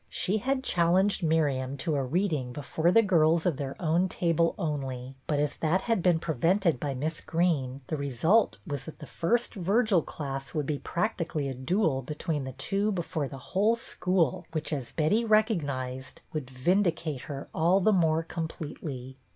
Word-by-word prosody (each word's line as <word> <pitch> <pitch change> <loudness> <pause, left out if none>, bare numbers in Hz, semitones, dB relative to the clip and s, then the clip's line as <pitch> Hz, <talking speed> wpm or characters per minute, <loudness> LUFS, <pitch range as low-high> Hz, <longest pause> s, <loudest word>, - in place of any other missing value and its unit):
She 205 +4 0
had 265 +3 -1
challenged 180 +3 +2
Miriam 140 -5 +1
to 155 +2 -1
a 140 - 0
reading 150 -3 -1
before 160 +5 0
the 225 +4 +6
girls 165 -4 +3
of 170 -7 +1
their 135 -1 -4
own 175 +2 +2
table 165 -1 +1
only, 135 - -3
but 150 -2 +1
as 145 -1 -1
that 165 +4 +1
had 230 -5 0
been 175 -1 +4
prevented 165 +1 +1
by 140 -1 -2
Miss 155 +4 -2
Greene, 145 -6 0
the 155 - -3
result 140 - +2
was 145 -5 -4
that 160 - -9
the 150 - -9
first 235 - 0
Virgil 200 0 +2
class 135 -2 -6
would 150 -2 0
be 145 0 -2
practically 170 -6 -2
a - - -3
duel 145 - 0
be 150 +4 -6
tween 150 -3 -2
the 130 - -6
two 195 - 0
before 170 -5 -2
the 135 - -8
whole 200 - +1
school, 180 - 0
which, 155 0 -2
as 135 -5 -3
Betty 185 +9 +2
recognized, 145 - 0
would 150 -5 -4
vindicate 165 0 0
her 140 -1 -5
all 175 +4 +3
the 215 +3 +3
more 165 -3 +3
completely. 150 -5 -6
160 Hz, 175 wpm, -28 LUFS, 140-185 Hz, -, the